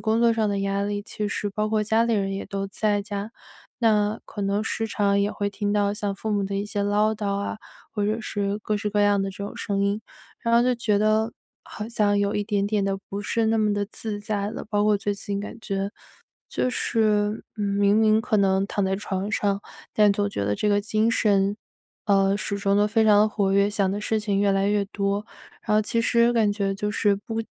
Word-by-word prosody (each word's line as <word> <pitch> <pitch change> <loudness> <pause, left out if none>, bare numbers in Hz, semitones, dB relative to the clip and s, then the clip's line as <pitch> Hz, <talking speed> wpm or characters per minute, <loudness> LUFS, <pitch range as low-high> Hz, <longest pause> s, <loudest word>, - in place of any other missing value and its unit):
工 225 +1 +1
作 235 -1 +5
上 220 -1 +1
的 200 - -1
压 195 0 0
力， 205 0 -2
其 210 0 -4
实 205 0 -2
包 210 +2 -1
括 215 0 +1
家 220 +2 +2
里 235 - 0
人 195 -2 0
也 195 - -4
都 195 0 -4
在 205 +1 0
家， 205 +1 -5 0.5
那 215 -2 +2
可 205 - -6
能 200 +1 0
时 225 0 -2
常 200 -2 +1
也 200 +1 +1
会 205 0 -2
听 205 0 -2
到 205 -1 +1
像 205 -2 -3
父 215 +2 -4
母 205 -1 +1
的 195 +1 -4
一 200 +1 -2
些 205 -1 -2
唠 210 +2 +2
叨 205 -2 -2
啊， 200 - -3 0.4
或 205 -2 -1
者 215 +2 0
是 205 -1 -2
各 215 0 -2
式 210 0 -2
各 205 0 +1
样 205 -1 +3
的 195 - -2
这 190 - -13
种 205 - -7
声 200 -3 -1
音。 200 +2 0 0.4
然 230 - 0
后 235 - +6
就 250 0 +2
觉 215 -3 +1
得 215 +1 +2 0.3
好 215 +1 -7
像 205 -3 +2
有 200 0 0
一 205 - 0
点 200 -1 0
点 205 -1 0
的 195 0 -1
不 200 +1 -4
是 225 +2 0
那 225 +1 +2
么 210 -1 +2
地 205 0 0
自 215 -2 -5
在 205 -1 -2
了， 230 - -6
包 205 -1 +1
括 210 -1 +4
最 205 -1 -1
近 200 0 -4
感 210 +3 -7
觉 195 -1 -2 0.6
就 - - 0
是， 215 -3 +1
嗯， 210 - -3
明 200 0 +2
明 220 0 +4
可 225 -2 0
能 195 -1 +2
躺 200 -1 -1
在 190 0 0
床 195 0 -3
上， 200 -1 0 0.3
但 210 -1 +5
总 205 0 0
觉 150 - -3
得 100 +1 0
这 210 - 0
个 205 0 +3
精 215 +1 +1
神 200 -2 +2 0.5
呃， 195 -1 +3
始 200 0 -3
终 200 0 +1
都 205 0 +4
非 220 +1 +2
常 210 -1 +6
地 215 - +4
活 200 -2 0
跃， 200 +1 +3
想 200 -2 +1
的 205 +2 -3
事 220 +1 0
情 205 -2 -1
越 200 0 +3
来 195 0 +1
越 205 -1 +2
多。 200 +1 -2 0.4
然 210 - 0
后 215 - +5
其 225 +2 0
实 235 +1 +3
感 220 -3 +2
觉 200 -1 -1
就 210 +1 -2
是 210 -1 +2
不 225 +3 -4
205 Hz, 255 characters per minute, -24 LUFS, 200-215 Hz, 0.6 s, 后